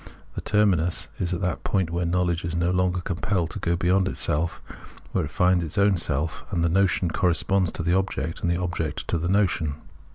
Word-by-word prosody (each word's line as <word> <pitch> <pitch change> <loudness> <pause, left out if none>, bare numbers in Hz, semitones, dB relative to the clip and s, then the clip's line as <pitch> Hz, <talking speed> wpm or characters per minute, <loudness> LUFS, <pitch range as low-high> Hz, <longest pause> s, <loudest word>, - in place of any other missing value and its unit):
The - - -5
ter 105 0 +3
minus 90 -3 +1
is 90 -1 -1
at 90 - -2
that 90 -1 -2
point 95 -4 0
where 85 0 -1
knowledge 90 -1 0
is 85 0 -2
no 85 +1 +1
longer 90 0 +1
compelled 90 -1 -1
to - - -5
go 85 0 0
beyond 95 +2 +2
itself, 85 -2 0 0.5
where 90 - 0
it - - -6
finds 90 +1 +2
its 80 +5 -4
own 100 0 +4
self, 80 -2 -1
and 85 - 0
the 85 - +3
notion 95 -1 +2
corresponds 90 +1 +1
to - - -4
the 85 +1 +1
object 95 -4 -1
and 85 - 0
the 85 - +1
object 85 -3 -3
to 85 - +1
the 85 +2 -2
notion. 90 -7 +1
90 Hz, 215 wpm, -25 LUFS, 85-95 Hz, 0.5 s, own